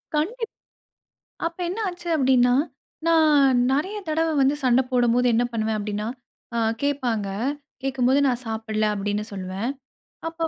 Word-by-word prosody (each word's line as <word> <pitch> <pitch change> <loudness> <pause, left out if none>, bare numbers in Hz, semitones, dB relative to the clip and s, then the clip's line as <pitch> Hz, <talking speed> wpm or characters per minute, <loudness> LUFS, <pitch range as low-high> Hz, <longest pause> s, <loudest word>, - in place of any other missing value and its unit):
கண்டிப் 445 +10 -1 1.0
அப்ப 335 +1 -5
என்ன 375 +6 -4
ஆச்சு? 355 -1 -7
அப்டின்னா, 255 -3 +4 0.5
நான் 300 -6 +5
நெறைய 335 +10 0
தடவ 320 +1 +1
வந்து 270 +2 +4
சண்ட 250 0 +5
போடும்போது 245 -1 +3
என்ன 240 +2 +3
பண்ணுவேன்? 220 -1 -1
அப்டின்னா 210 0 -3 0.5
அ - - +1 0.2
கேப்பாங்க. 245 -8 0 0.5
கேக்கும்போது 265 0 +2
நான் 250 -1 0
சாப்பிடல 220 -1 -1
அப்டின்னா 205 +1 -2
சொல்லுவேன். 190 +4 -3 0.6
அப்ப 330 0 -2
255 Hz, 125 wpm, -24 LUFS, 220-305 Hz, 1.0 s, நான்